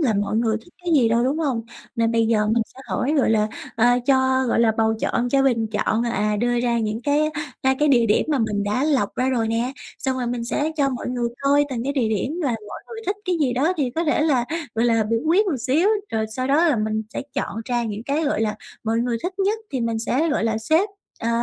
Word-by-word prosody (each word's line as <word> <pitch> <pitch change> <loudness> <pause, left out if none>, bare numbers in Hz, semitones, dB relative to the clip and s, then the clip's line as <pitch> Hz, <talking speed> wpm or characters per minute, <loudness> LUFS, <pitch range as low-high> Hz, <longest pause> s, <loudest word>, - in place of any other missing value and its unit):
là 250 -8 +2
mọi 205 +2 0
người 225 -1 +1
thích 350 - -21
cái 345 - 0
gì 250 -6 +4
đâu, 235 +2 +2
đúng 280 +4 0
hông? 265 -8 -1 0.3
Nên 230 0 +1
bây 230 -1 +2
giờ 215 -2 +2
mình 225 +2 +2
sẽ 265 - -12
hỏi, 285 +5 0
gọi 260 - +3
là, 215 -1 +2 0.3
ờ, 230 +1 +4 0.2
cho, 260 -1 +3
gọi 230 - +2
là, 225 -1 +4
bầu 220 0 +3
chọn, 245 0 0
cho 270 +2 +3
bình 230 -4 +2
chọn, 220 +1 0
à, 210 -3 0
đưa 240 +2 +1
ra 240 -1 +1
những 220 +1 -2
cái, 295 +3 +2 0.3
a, 265 0 +3
cái 300 - +3
địa 240 -4 +4
điểm 210 - +3
mà 295 -3 +1
mình 210 -3 0
đã 210 +7 0
lọc 270 -10 +1
ra 255 - 0
rồi 230 -4 0
nè, 235 +3 -1 0.3
xong 265 -1 -1
rồi 245 - -2
mình 240 -1 -2
sẽ 295 +6 -1
cho 280 -2 +2
mọi 255 -2 -4
người 245 -1 -1
coi 285 +1 +3
từng 240 -2 -3
cái 280 - -1
địa 255 -6 +1
điểm 255 - -2
là 275 - +1 0.2
mọi - - -7
người 455 -1 -8
thích 395 +1 0
cái 360 -2 0
gì 265 -4 +2
đó, 280 +8 +2
thì 275 -5 0
có 330 +7 -2
thể 300 0 +2
là, 275 -6 +2 0.3
gọi 225 - +1
là, 225 -2 +3
biểu 230 +1 0
quyết 375 +7 +4
một 325 -8 0
xíu. 310 - +2 0.2
Rồi 220 -1 -1
sau 255 - -1
đó 315 +5 +4
là 285 - +2
mình 215 0 -1
sẽ - - -2
chọn 210 - -3
ra 240 -1 -1
những 215 -1 -4
cái, 290 +5 -1
gọi 285 - 0
là, 215 -1 0 0.3
mọi 225 +1 +1
người 240 -1 0
thích 370 +2 -4
nhất 400 +3 +1
thì 260 -3 -2
mình 230 -1 -1
sẽ, 260 +8 0
gọi 295 -7 0
là, 220 -1 0
xếp, 315 - +2 0.3
ờ, 230 - -1
245 Hz, 265 wpm, -22 LUFS, 225-285 Hz, 0.3 s, gì